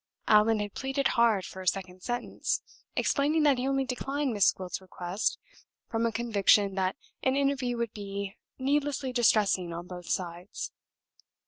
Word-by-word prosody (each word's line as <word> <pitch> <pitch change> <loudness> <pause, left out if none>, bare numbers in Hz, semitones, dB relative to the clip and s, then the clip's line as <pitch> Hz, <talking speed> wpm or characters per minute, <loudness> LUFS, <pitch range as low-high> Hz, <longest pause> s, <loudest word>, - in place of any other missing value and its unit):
Allan 215 +1 +5
had 205 -1 -4
pleaded 270 +1 0
hard 230 -5 +3
for 190 - -8
a 185 - -8
second 185 0 -1
sentence, 240 +4 -2 0.3
explaining 300 +2 +2
that 280 -4 +4
he 255 - -1
only 270 0 +1
declined 270 +1 -2
Miss 205 -3 +5
Gwilt's 185 0 -6
request 185 +1 -2 0.5
from 230 0 +1
a - - -1
conviction 205 -3 +3
that 185 -1 0 0.3
an 260 0 +2
interview 275 -3 +1
would 235 -2 -2
be 200 -1 -5 0.2
needlessly 275 -1 0
distressing 210 -7 +3
on 170 +1 -5
both 180 -1 -9
sides. 175 +1 -3
225 Hz, 150 wpm, -29 LUFS, 190-265 Hz, 0.5 s, Allan